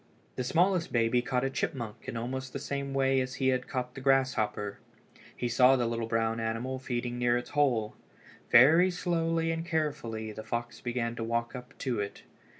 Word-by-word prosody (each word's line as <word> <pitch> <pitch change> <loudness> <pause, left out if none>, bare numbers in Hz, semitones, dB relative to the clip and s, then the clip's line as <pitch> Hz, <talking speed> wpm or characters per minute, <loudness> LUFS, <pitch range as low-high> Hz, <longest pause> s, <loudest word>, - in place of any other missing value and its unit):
The 125 - -2
smallest 170 +6 +2
baby 120 +1 +2
caught 125 0 -1
a 135 - +1
chipmunk 130 -6 -4
in 115 - -4
almost 130 +3 -4
the - - -2
same 140 0 -4
way 135 -1 +2
as 130 0 -4
he 130 -1 +1
had 130 -1 0
caught 125 -1 -3
the 135 - -8
grasshopper. 125 -7 +1 0.6
He 120 - -1
saw 125 +3 +5
the 125 -2 +1
little 115 -1 -2
brown 115 0 0
animal 115 +4 -2
feeding 120 -1 -3
near 120 0 +3
its 120 - -6
hole. 125 -7 +1 0.5
Very 160 +9 +7
slowly 165 -2 0
and 165 0 -2
carefully 150 -10 -2
the 110 - -7
fox 120 +2 -4
began 120 -1 -2
to 115 - -3
walk 115 +2 -2
up 125 +1 -10
to 125 -5 -2
it. 100 0 -5
125 Hz, 185 wpm, -30 LUFS, 115-135 Hz, 0.6 s, Very